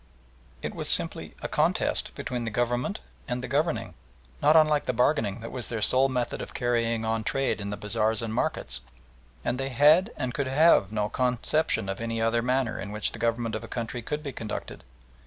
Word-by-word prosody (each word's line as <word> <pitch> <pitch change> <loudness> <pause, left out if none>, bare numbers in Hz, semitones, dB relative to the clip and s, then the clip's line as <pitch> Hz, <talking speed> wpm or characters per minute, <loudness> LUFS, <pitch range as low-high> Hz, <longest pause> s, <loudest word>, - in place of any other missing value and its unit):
It - - -3
was - - -3
simply - - 0
a - - -1
contest - - 0
between 125 -1 -3
the 115 - -2
Government 120 - -1 0.3
and 125 0 -3
the - - -3
governing, 140 - 0 0.5
not 150 +2 +5
unlike 155 -2 +5
the 125 - 0
bargaining 115 -4 +1
that 115 - -7
was 125 -2 -3
their 115 - -2
sole 130 +5 +5
method 125 -2 -2
of - - -8
carrying 115 -2 0
on 110 0 0
trade 135 -2 0
in 100 - -4
the 105 - -4
bazaars 110 +2 +1
and 110 -1 -3
markets, 65 - -1 0.6
and 125 +2 -1
they 135 0 -2
had 155 - +5
and 125 -1 -2
could 140 -1 -1
have 135 - +4
no 105 -1 0
conception 125 0 0
of 95 +2 -4
any 115 0 -2
other 115 +1 +2
manner 125 -1 0
in 100 - -5
which 105 0 0
the 115 - -8
Government 115 0 0
of 110 - -3
a - - -7
country 120 0 -4
could 150 +5 -4
be 140 - -4
conducted. 110 -2 -6
120 Hz, 200 wpm, -27 LUFS, 110-135 Hz, 0.6 s, not